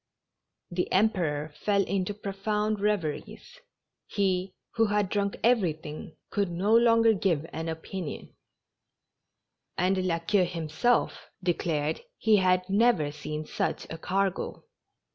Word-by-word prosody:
The 180 +1 -1
Emperor 165 -8 +1
fell 200 -1 +2
into 195 +1 -2
profound 210 +1 -1
reveries 200 -7 -2 0.2
— - - -58
he, 190 -1 +1 0.2
who 225 -1 +3
had 205 -2 +1
drunk 200 -1 -1
everything, 165 -10 0 0.2
could 200 -2 0
no 190 +6 +2
longer 230 -1 +5
give 175 -7 0
an 160 +1 -3
opinion; 165 +1 -6 1.4
and 185 +1 +2
La 165 -2 +1
Queue 180 +3 +2
himself 165 +8 0
de 175 -1 +3
clared 155 -2 -1 0.2
he 215 -1 +4
had 185 -1 +2
never 200 -7 +3
seen 150 +1 -5
such - - -2
a 160 - -6
cargo. 195 +2 -1
190 Hz, 125 wpm, -28 LUFS, 165-210 Hz, 1.4 s, longer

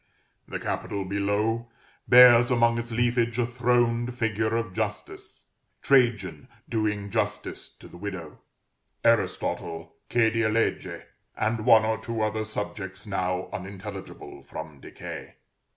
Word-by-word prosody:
The - - -5
capital 100 -1 -3
below 105 +4 -1 0.4
bears 120 -1 +8
among 120 -1 +3
its 120 0 -5
leafage 120 0 +1
a 120 - +2
throned 120 0 +1
figure 110 -1 0
of 115 -5 -3
Justice, - - -5 0.4
Trajan 115 - +2 0.2
doing 105 -2 -1
justice - - -2
to - - -14
the - - -13
widow, 90 -6 -6 0.6
Aristotle 85 -7 0 0.2
"che 115 -2 +3
die 115 -1 +1
legge," 115 +1 -1 0.3
and 110 0 -1
one 110 -1 +7
or 110 -1 0
two 110 0 -3
other 110 0 -1
subjects 100 -2 -5
now 90 -2 -2
unintelligible 95 -6 -8
from 80 0 -9
decay. - - -9
110 Hz, 120 wpm, -26 LUFS, 100-115 Hz, 0.6 s, bears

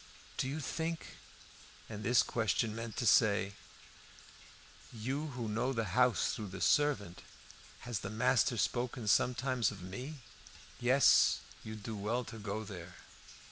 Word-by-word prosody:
"Do - - 0
you 145 +4 -3
think 160 +3 -4 0.3
" - - -21
And 105 -1 -7
this 120 +3 +4
question 110 -1 0
meant 115 -1 -6
to 120 - -1
say 100 -4 +4 1.4
"You 130 +7 -3
who 125 -5 -5
know 115 +5 0
the 115 -2 0
house 125 +1 +3
through 105 - -5
the 95 0 -8
servant, 135 -9 +2 0.6
has 120 -4 -3
the 100 - -5
master 120 +2 +2
spoken 120 0 -1
sometimes 125 0 +2
of 100 -3 -9
me?" 125 +10 -7 0.6
"Yes, 130 +2 +5 0.2
you'd 110 -1 -8
do 110 +1 -4
well 110 +5 -1
to 115 -1 -9
go 105 +1 -4
there." 90 -4 -9
115 Hz, 140 wpm, -34 LUFS, 105-125 Hz, 1.4 s, Yes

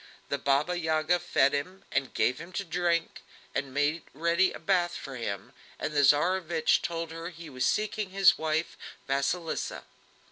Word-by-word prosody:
The 140 - -1
Baba 145 +6 +1
Yaga 160 +1 +1
fed 135 -4 +2
him 185 +7 -3
and 135 - 0
gave 125 - +2
him 170 +2 -9
to 200 - -2
drink, 170 -1 -1 0.3
and 135 -1 -2
made 145 +4 +1
ready 170 +4 +3
a - - -7
bath 180 -3 +1
for 135 - -7
him, 105 -5 -5 0.2
and 155 - -3
the 145 - +3
Tsarevich 165 +3 +3
told 165 -1 -3
her 165 +1 -6
he 165 -3 -11
was 130 -1 0
seeking 215 -1 0
his 195 0 +5
wife, 160 +1 -1 0.3
Vasilisa. 140 +5 -1
165 Hz, 165 wpm, -29 LUFS, 145-175 Hz, 0.3 s, his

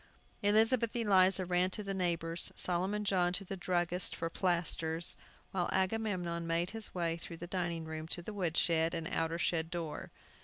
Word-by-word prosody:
Elizabeth 225 +3 +3
Eliza 190 -4 +4
ran 180 +1 +2
to 210 +3 -5
the 195 -1 -3
neighbors, 170 -2 0
Solomon 190 +4 0
John 180 -3 +2
to 195 +1 -1
the 195 - -5
druggist's 180 -1 0
for 165 - -3
plasters, 170 -2 +1 0.4
while 180 -2 -1
Agamemnon 185 -4 -1
made 170 +2 0
his 220 -2 -2
way 170 -2 -1
through 170 0 -8
the 175 - -7
dining 170 -2 -2
room 160 0 -6
to 175 +1 -3
the 215 - -6
wood 175 -5 -1
shed 165 0 +2
and 165 -1 -3
outer 165 -2 -1
shed 165 -1 0
door. 165 -4 -5
175 Hz, 170 wpm, -33 LUFS, 165-190 Hz, 0.4 s, Eliza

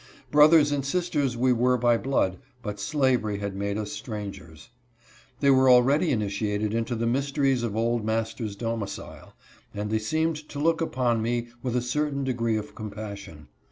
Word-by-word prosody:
Broth 150 +2 +7
ers 150 -3 +5
and 140 -1 0
sisters 145 -5 -1
we 125 +1 +3
were 125 +1 +2
by 120 0 +3
blood, 115 -8 0 0.2
but 105 -2 -5
slavery 120 -2 +1
had 100 -1 -4
made 100 +1 -2
us 105 -1 -4
strangers. 100 -3 -8 0.7
They 140 -1 +5
were 130 0 +5
already 135 +7 +5
initiated 105 -2 -1
into 115 +1 -1
the 115 +1 -1
mys 135 +4 0
teries 135 -3 +2
of 115 -3 -3
old 115 0 0
master's 110 -1 -2
domicile, 115 -2 -5 0.4
and 105 +1 -3
they 110 - +2
seemed 155 +5 -1
to - - -8
look 165 +3 +1
upon 125 -7 0
me 120 +1 -1
with 125 -2 -2
a 125 - +1
certain 140 +2 -1
degree 115 -4 0
of 105 0 -6
compassion. 100 -7 -8
120 Hz, 170 wpm, -26 LUFS, 105-135 Hz, 0.7 s, Broth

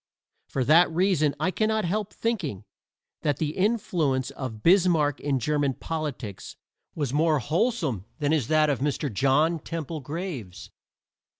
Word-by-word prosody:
For 135 - -1
that 160 +7 +6
reason 160 -4 +2
I 180 +4 +1
cannot 215 0 0
help 205 +3 -2
thinking 185 - -2 0.6
that 145 -3 0
the 155 -1 -2
influence 165 - 0
of 130 -6 -7
Bismarck 165 -5 +4
in 140 -2 0
German 145 +1 0
politics 145 - -5 0.4
was 145 -5 -2
more 155 +1 +3
wholesome 155 - -1
than 150 -1 +1
is 145 -8 +1
that 155 -1 +3
of 140 - -1
Mr. 145 -2 -1
John 150 - +2
Temple 165 0 -5
Graves. 145 - -6
155 Hz, 135 wpm, -26 LUFS, 135-175 Hz, 0.6 s, that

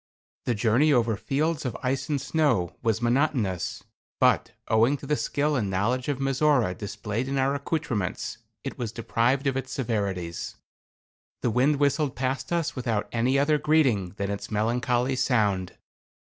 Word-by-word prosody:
The 120 - +1
journey 120 +8 +3
over 115 -4 +3
fields 150 - -1
of 125 - -3
ice 130 +4 -1
and 145 -2 +1
snow 135 - +1
was 115 0 0
monotonous, 120 - 0 0.4
but, - - +3 0.2
owing 115 +6 +3
to - - -10
the 150 - +1
skill 150 +1 0
and 105 -7 0
knowledge 110 +7 0
of 145 -2 0
Mizora 135 -6 +2
displayed 105 +4 -4
in 135 0 -1
our 135 +1 +2
accoutrements, 140 - -2 0.2
it - - -6
was 115 -3 -2
deprived 120 +4 0
of 135 -2 +1
its 135 - -3
severities. 100 -9 -2 0.9
The 120 - +2
wind 130 +6 +3
whistled 145 0 +1
past 130 +4 -2
us 170 -3 0
without 120 -5 -1
any 125 +3 +2
other 150 +2 +3
greeting 130 - +2
than 100 0 -2
its 100 0 -5
melancholy 120 +4 +1
sound. 105 -8 +1
125 Hz, 155 wpm, -26 LUFS, 110-140 Hz, 0.9 s, journey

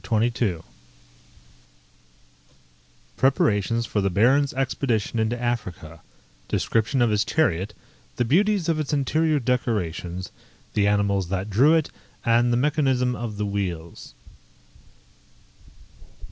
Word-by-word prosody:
CHAPTER 115 +1 +1
XXII 110 -8 -1 2.6
_Preparations 115 -4 +2
for 105 - -1
the 100 - +1
Baron's 130 +9 +3
expedition 125 -4 -1
into 110 +2 0
Africa 95 -10 -4 0.5
Description 115 +3 +1
of 115 - +2
his 105 -1 +2
chariot; 105 - 0 0.4
the 120 - 0
beauties 190 - +2
of 165 -2 +1
its 150 -1 -2
interior 155 +2 +1
decorations; 95 -8 -2 0.4
the 100 -1 +2
animals 100 -3 +1
that 95 +2 -3
drew 140 +11 +5
it, 160 -2 0 0.3
and 120 +1 +3
the 120 - +2
mechanism 130 -3 +1
of 115 -2 -5
the 105 - -1
wheels. 90 -5 -5
115 Hz, 110 wpm, -24 LUFS, 100-135 Hz, 2.6 s, drew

